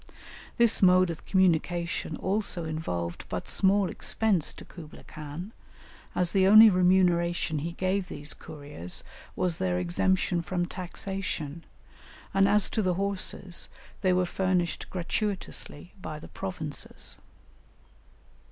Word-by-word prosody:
This 235 -2 +4
mode 185 -1 +6
of 165 - -9
communication 170 -3 +1
also 195 -3 -1
involved 90 - -3
but - - -4
small 195 0 +3
expense 195 0 0
to - - -12
Kublaï 160 -4 -12
Khan, 155 +6 -7 0.6
as 180 -1 +1
the 190 -1 +4
only 215 +2 +10
remuneration 175 -3 +3
he 165 +4 -4
gave 185 +1 -1
these 150 -4 -5
couriers 145 - -6 0.3
was 180 -3 -1
their 90 -1 +1
exemption 170 - +1
from 175 +1 -1
taxation, 175 -4 -5 0.7
and 195 0 +4
as 205 -1 +4
to 220 - +1
the 185 -3 +1
horses, 195 -2 -1 0.3
they 185 -2 +3
were 180 0 +3
furnished 180 -1 -1
gratuitously 185 -3 -4
by 155 - -5
the 150 - -10
provinces. 175 -6 -5
180 Hz, 120 wpm, -28 LUFS, 160-190 Hz, 0.7 s, only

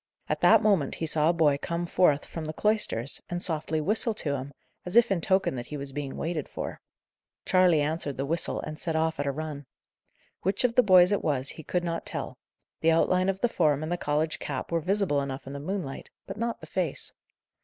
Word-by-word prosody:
At - - -2
that - - +6
moment 195 -10 +2
he 165 - -3
saw 155 0 +3
a - - +3
boy 150 -4 +3
come 170 +1 -2
forth 155 -4 +2
from 165 -2 -6
the 155 - -4
cloisters, 210 - +1
and 175 - -2
softly 160 -2 -1
whistle 215 +7 0
to 150 -9 -1
him, 135 +1 -6 0.3
as 180 - -5
if 235 -2 +6
in 185 -3 +1
token 190 +3 +3
that 120 0 -6
he 150 - -6
was 140 -1 -6
being 140 -1 -5
waited 160 -3 -3
for. - - -6 0.6
Charley 180 -4 +4
answered 150 -2 -2
the 135 - -2
whistle, 165 +3 -1
and 155 +1 -7
set 165 -3 -2
off 160 -1 0
at 145 - -1
a - - +1
run. 145 -1 -6 0.7
Which 195 +6 0
of 245 -2 +2
the 250 - +6
boys 185 -3 +6
it 205 - 0
was 135 -3 0
he - - -6
could 175 +3 -2
not 165 -1 -3
tell; - - -5 0.4
the 160 - +3
outline 185 +3 +2
of 195 0 -2
the 240 - +3
form 155 - +1
and 155 - -4
the - - +2
college 155 -1 -1
cap 140 +2 -5
were 170 - +2
visible 185 -5 +1
enough 135 -1 -5
in 135 - -7
the 140 - -5
moonlight; 160 -3 -5 0.2
but 195 - -7
not 230 +1 -3
the - - -8
face. 175 -6 -3
160 Hz, 225 wpm, -27 LUFS, 145-185 Hz, 0.7 s, that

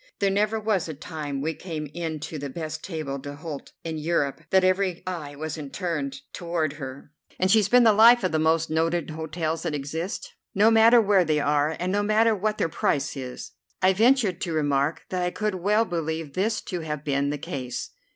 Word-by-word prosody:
There 200 -1 +1
never 210 +3 +1
was 210 -6 0
a 155 - -5
time 145 -2 -5
we 160 +3 -1
came 160 -3 -6
in 165 -2 -3
to 155 0 -5
the 140 0 -5
best 155 +2 -5
table 155 -6 -4
d'hôte 145 +1 -7
in 160 -1 -4
Europe 155 -2 0
that 190 0 +4
every 185 -1 +1
eye 160 -6 -5
wasn't 155 -1 -6
turned 145 -7 -3
toward 170 -4 -2
her, 140 -1 -8 0.3
and 185 +1 +2
she's 215 -2 +4
been 245 +2 +6
the 220 -2 +6
life 230 +2 +7
of 185 - +1
the 160 - +1
most 160 0 +2
noted 165 0 0
hotels 160 +1 -3
that 160 -3 -2
exist, 160 - -4 0.2
no 210 +3 +5
matter 225 +2 +7
where 200 -4 +4
they 155 -2 +1
are, 145 +2 +1
and 180 +1 -1
no 205 +1 +1
matter 215 +2 +3
what 210 +1 -1
their - - +1
price 150 -3 -1
is." 130 -2 -7 0.3
I 190 0 +4
ventured 220 -3 +3
to 170 - -2
remark 145 -1 0
that 185 -1 -2
I 180 - +1
could 210 +3 -2
well 205 +5 +2
believe 160 -4 -3
this 215 +4 0
to 180 - -5
have 150 -3 -4
been 140 -1 +1
the 150 - -2
case. 130 -3 -5
165 Hz, 200 wpm, -25 LUFS, 150-195 Hz, 0.3 s, life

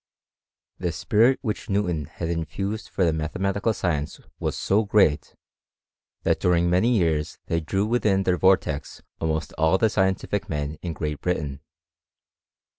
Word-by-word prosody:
The 90 -2 -1
spirit 120 +6 +3
which 110 -5 -3
Newton 90 -7 0
had 85 - -6
infused 95 +6 -3
for 95 - +1
the 80 - +2
ma 80 0 -2
lematical 100 +5 -1
science 75 -6 -2 0.2
was - - -2
so 105 +3 +2
great, 100 -8 +2 0.9
that - - +2
during 85 -1 +2
many 110 +7 +3
year* 80 -5 +2 0.3
ley 85 - +1
drew 95 +5 -1
within 105 -4 +2
their 90 -1 +2
vortex 95 -6 +1 0.2
almost 80 0 -2
all 80 +4 +4
the 110 +1 +2
scientific 95 +1 0
en 75 0 -3
in 85 -2 -4
Great 75 -1 -4
Britain. 75 -6 -2
90 Hz, 145 wpm, -25 LUFS, 80-100 Hz, 0.9 s, all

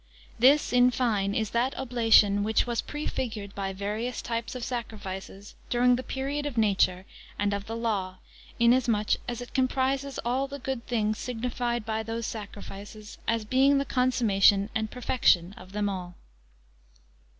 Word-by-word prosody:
This, 270 +3 +5
in 250 0 +6
fine, 215 -6 0
is 220 -2 -1
that 245 +3 0
oblation 225 -5 +4
which 215 +2 +2
was 240 -2 -1
prefigured 225 -9 -4
by 195 -1 -3
various 210 +5 -3
types 230 +1 -3
of 250 - -5
sacrifices, 205 -5 -6 0.2
during 245 +1 +4
the 250 - -3
period 275 +3 -3
of 265 -5 -6
nature, 195 -4 +2 0.3
and 205 0 0
of 200 0 -4
the 225 - -4
law; 200 -5 -2 0.4
in 235 0 +5
as 255 -1 +1
much 215 -2 +2
as 245 0 -4
it 245 - -9
comprises 265 +1 0
all 260 +3 0
the 280 +1 -7
good 260 -3 -4
things 215 -2 0
signified 240 -1 -2
by 220 -1 -1
those 225 +1 -4
sacrifices, 210 0 -8
as 230 -2 0
being 270 +5 +4
the 275 - 0
consummation 215 -6 +3
and 220 -2 -1
perfection 205 -7 +2
of 185 +1 -13
them 205 0 -1
all. 180 -3 -5
230 Hz, 160 wpm, -27 LUFS, 205-250 Hz, 0.4 s, in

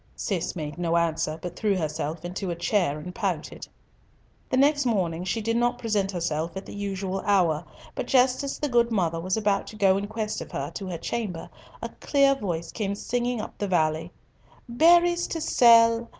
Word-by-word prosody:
Cis 185 -3 -2
made 155 -1 -5
no 170 -1 +1
answer, 165 -1 0
but 180 - -5
threw 210 -3 +1
herself 155 0 -3
into 180 +2 -4
a 170 - -2
chair 170 -3 0
and 180 +4 -8
pouted. 190 -8 -3 0.8
The 255 - +1
next 285 +2 +4
morning 180 -8 0
she 220 +5 -1
did 230 +1 -1
not 240 +1 +1
present 210 -5 -1
herself 165 -1 -2
at 190 - -6
the - - -9
usual 195 -1 -3
hour; 180 -7 +2 0.3
but - - -4
just 255 0 +3
as 280 - -3
the 295 - -1
good 240 -3 +3
mother 170 -6 0
was 185 +4 -1
about 205 -2 0
to - - -9
go 195 -2 +3
in 200 +1 -3
quest 215 0 -3
of - - -8
her - - -3
to 195 - -6
her 175 -2 -4
chamber, 195 -2 -4 0.3
a - - -3
clear 275 -1 +3
voice 175 -10 -4
came 200 -3 -2
singing 245 +2 -2
up - - -6
the 205 - -1
valley— 160 -2 0 0.6
"Berries 345 +7 +4
to 330 - -3
sell! 230 -5 +5
200 Hz, 195 wpm, -26 LUFS, 170-235 Hz, 0.8 s, sell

